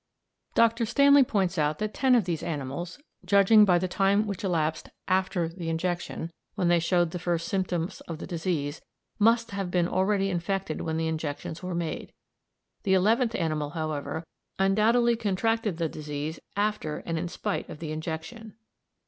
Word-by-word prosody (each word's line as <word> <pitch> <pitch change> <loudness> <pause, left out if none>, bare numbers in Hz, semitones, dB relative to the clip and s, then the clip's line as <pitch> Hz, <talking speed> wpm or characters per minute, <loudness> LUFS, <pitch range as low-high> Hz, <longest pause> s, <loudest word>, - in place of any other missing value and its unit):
Dr. 230 0 +3
Stanley 280 +3 +6
points 190 -7 0
out 150 0 +1
that 215 0 -3
ten 260 -2 +3
of 230 -6 +3
these 170 -3 -2
animals, 155 +2 -4 0.3
judging 205 +2 +6
by 180 -3 +4
the 185 +2 0
time 195 +3 +2
which 200 -2 -5
elapsed 160 -4 -1 0.2
after 185 -2 +1
the 165 0 -6
injection, 170 0 -2 0.2
when 185 -4 +1
they 175 0 +5
showed 175 0 +2
the 180 - -4
first 170 -1 -1
symptoms 180 -3 -2
of 165 - -5
the - - -7
disease, 160 -4 -2 0.4
must 230 +1 +3
have 195 -2 -3
been 175 -1 +2
already 195 +2 +1
infected 180 -1 -2
when 160 0 -2
the 160 0 0
injections 160 0 -4
were 180 -1 -4
made; 170 -2 -4 0.7
the 190 -2 +2
eleventh 225 +5 +3
animal, 155 -3 -1
however, 155 0 -3 0.3
undoubtedly 220 +5 +3
contracted 220 -2 0
the 165 -1 0
disease 150 +1 -5 0.2
after 205 -7 -1
and 165 -1 -2
in 175 - -2
spite - - -3
of - - -7
the 155 -1 -5
injection. 165 +8 -6
180 Hz, 165 wpm, -27 LUFS, 160-205 Hz, 0.7 s, Stanley